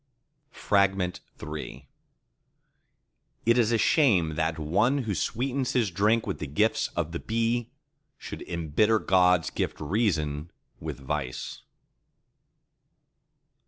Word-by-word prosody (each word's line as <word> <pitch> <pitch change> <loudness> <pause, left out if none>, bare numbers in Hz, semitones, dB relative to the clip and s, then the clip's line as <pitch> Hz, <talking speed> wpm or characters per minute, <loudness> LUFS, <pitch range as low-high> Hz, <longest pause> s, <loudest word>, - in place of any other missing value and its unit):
III 95 -8 -1 1.6
It 115 +1 +4
is 115 -1 +3
a 115 - +3
shame 100 - +3
that 80 +1 -1
one 95 - +2
who 110 -3 -2
sweetens 130 +6 -1
his 115 -7 +1
drink 105 +5 +2
with 100 - -4
the 75 - -4
gifts 105 +11 +1
of 85 -2 -1
the 85 - -4
bee, 115 +1 -1 0.5
should - - -8
embitter 85 +7 +2
God's 90 -4 +3
gift - - -3
Reason 80 -4 -1 0.3
with - - -6
vice. 70 -2 -4
95 Hz, 105 wpm, -27 LUFS, 80-115 Hz, 1.6 s, It